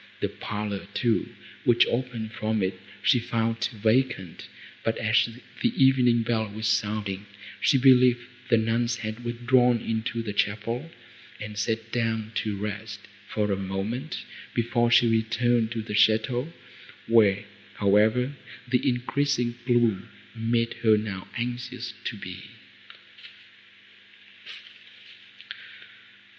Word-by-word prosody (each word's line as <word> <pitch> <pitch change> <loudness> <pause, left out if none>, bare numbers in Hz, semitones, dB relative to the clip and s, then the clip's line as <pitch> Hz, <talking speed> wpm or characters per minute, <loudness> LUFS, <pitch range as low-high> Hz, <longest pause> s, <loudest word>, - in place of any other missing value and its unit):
The - - -1
parlour 105 -2 -5
too, 115 -2 +1 0.3
which 120 -1 +5
opened 120 -3 -3
from 110 -2 -1
it, 95 +1 0 0.3
she 125 - +4
found 115 0 -1
vacant, 110 -5 0 0.4
but, 115 - 0
as 110 +1 +2 0.3
the 240 -1 +2
evening 125 -3 +4
bell 110 -2 0
was 110 +2 -5
sounding, 105 -2 -1 0.3
she 140 - +4
believed 125 -2 +6 0.3
the 115 - +5
nuns 115 +2 +1
had 110 0 -6
withdrawn 120 0 +3
into 115 +1 -2
the 105 -2 -4
chapel, 115 +9 -1 0.5
and 105 0 -7
sat 110 +2 -2
down 115 -2 -1
to 105 -2 -2
rest, 105 +1 -5 0.3
for 105 -1 -1
a - - +2
moment, 100 +9 -4 0.3
before 120 0 +2
she 120 0 +5
returned 115 +1 +1
to 115 -1 -3
the 105 - -6
château, 110 +7 +2 0.5
where, 105 -3 +4 0.3
however, 110 +6 +3 0.3
the 125 +1 +2
increasing 125 0 0
gloom 120 -5 +2 0.3
made 115 +1 0
her 110 -2 +5
now 100 -3 -5
anxious 120 +1 -4
to - - -3
be. - - -8
115 Hz, 115 wpm, -26 LUFS, 105-120 Hz, 0.5 s, believed